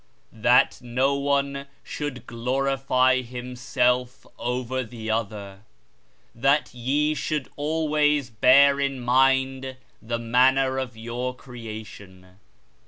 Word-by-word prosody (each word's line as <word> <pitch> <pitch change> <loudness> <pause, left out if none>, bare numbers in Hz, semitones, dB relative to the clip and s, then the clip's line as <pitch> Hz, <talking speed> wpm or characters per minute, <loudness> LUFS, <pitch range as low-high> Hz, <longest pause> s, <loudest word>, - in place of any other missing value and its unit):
That 120 +3 +3
no 125 +3 0
one 140 0 -1 0.2
should 145 -4 -6
glorify 130 +1 +1
himself 125 +1 -2
over 125 +1 -2
the 110 -2 -6
other, 100 -3 -4 0.7
that 135 +5 +1
ye 140 +5 0
should 150 -2 -3
always 150 -3 0
bear 140 +5 +5
in 140 -1 -1
mind 130 +1 +1 0.2
the 115 +1 -3
manner 130 +3 +2
of 125 -3 -5
your 120 +3 -4
creation. 110 -7 -11
130 Hz, 100 wpm, -24 LUFS, 120-135 Hz, 0.7 s, bear